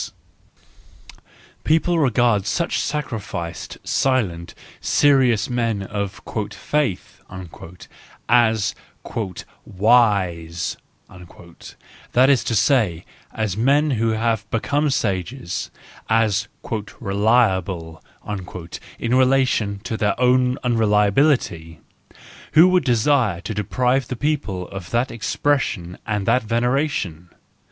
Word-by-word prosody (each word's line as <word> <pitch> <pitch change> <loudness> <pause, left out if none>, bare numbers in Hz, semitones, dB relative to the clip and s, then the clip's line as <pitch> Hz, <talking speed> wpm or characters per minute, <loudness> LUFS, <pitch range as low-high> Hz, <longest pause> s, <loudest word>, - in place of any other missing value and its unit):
The - - -17
people 165 +2 +2
regard 120 -7 +2
such 170 +11 0
sacrificed, 110 - -4
silent, 100 -11 -1 0.2
serious 130 -6 +3
men 115 -5 -1
of 100 0 -5 0.3
"faith" 145 -11 -2 1.1
as 110 -3 +3 0.2
" - - -37 0.6
wise 95 -6 +1 0.2
* - - -40
9 85 -1 -15 0.6
that 130 +2 +5
is 135 - +2
to 115 - -1
say, 105 - +2 0.3
as 110 -4 -2
men 140 +7 +2
who 115 -3 0
have 110 -1 -1
become 145 +6 0
sages, 100 -3 -2 0.4
as 110 -3 +2 0.5
"reliable" 95 -6 0 0.9
in 115 +1 -2
relation 130 -6 +2
to 110 - -3
their 105 +2 0
own 125 0 +3
unreliability. 105 - +1 0.7
Who 165 +4 +8
would 185 -2 +3
desire 120 - +2
to 110 - -5
deprive 125 +5 0
the 130 - -4
people 120 -11 -2
of 95 -3 -8
that 120 +3 0
expression 115 -7 -1
and 105 -2 -1
that 125 - +3
veneration 115 - -1
115 Hz, 100 wpm, -21 LUFS, 100-130 Hz, 1.1 s, Who